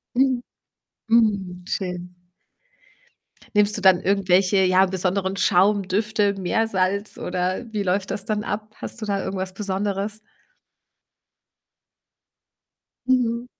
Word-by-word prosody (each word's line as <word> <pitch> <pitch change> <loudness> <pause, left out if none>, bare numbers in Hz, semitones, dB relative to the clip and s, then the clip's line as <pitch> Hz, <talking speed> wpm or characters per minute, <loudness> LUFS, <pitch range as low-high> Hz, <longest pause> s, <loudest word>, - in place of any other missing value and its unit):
Mhm. 255 -1 +2 0.7
Mhm, 200 -6 +1
schön. 180 -3 -4 1.4
Nimmst 210 0 +3
du 205 - -5
dann 185 -2 +6
irgendwelche, 195 0 +2
ja, 185 +1 +4
besonderen 190 +1 +1
Schaum, 195 +1 +3
Düfte, 210 +1 +1
Meersalz, 200 +1 0
oder, 185 +5 -2
wie 210 -2 -2
läuft 190 +1 -1
das 195 - -4
dann 215 -2 -2
ab? 215 +1 -4
Hast 235 - -8
du - - -3
da 200 -1 -1
irgendwas 190 -1 -4
Besonderes? 200 +1 -3 2.9
Mhm. 245 -2 +1
200 Hz, 105 wpm, -23 LUFS, 185-215 Hz, 2.9 s, dann